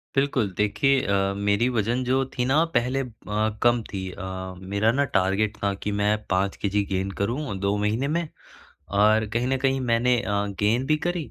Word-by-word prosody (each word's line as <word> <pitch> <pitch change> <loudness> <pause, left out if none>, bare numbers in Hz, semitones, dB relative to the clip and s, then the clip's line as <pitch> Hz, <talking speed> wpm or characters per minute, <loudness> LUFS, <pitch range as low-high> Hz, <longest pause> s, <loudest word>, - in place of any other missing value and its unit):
बिल्कुल, 135 -6 +1
देखिए 135 +6 +2
अ, 100 0 +1
मेरी 100 +3 +2
वज़न 120 +1 0
जो 130 +2 +1
थी 125 - +1
न 130 - +1 0.2
पहले 125 +3 +1
अ, 130 - -5 0.6
कम 120 0 +4
थी 95 -2 -4
अ, 95 -1 -6 0.2
मेरा 110 +3 +3
न 140 +4 +1
टारगेट 100 +2 +1
था 100 -1 +1
कि 105 - -1
मैं 105 +1 +2
5 95 +1 +1
केजी 100 0 +1
गेन 95 +1 -1
करूँ 120 +1 -2
2 100 +1 0
महीने 105 +6 0
में 165 +2 -1 0.7
और 110 +1 +4
कहीं 120 +2 0
न 135 - +1
कहीं 135 0 +2
मैंने 125 0 +2
अ, - - -4 0.3
गेन 115 +5 +2
भी 155 - +3
करी 175 -4 -2
110 Hz, 185 wpm, -25 LUFS, 100-130 Hz, 0.7 s, कम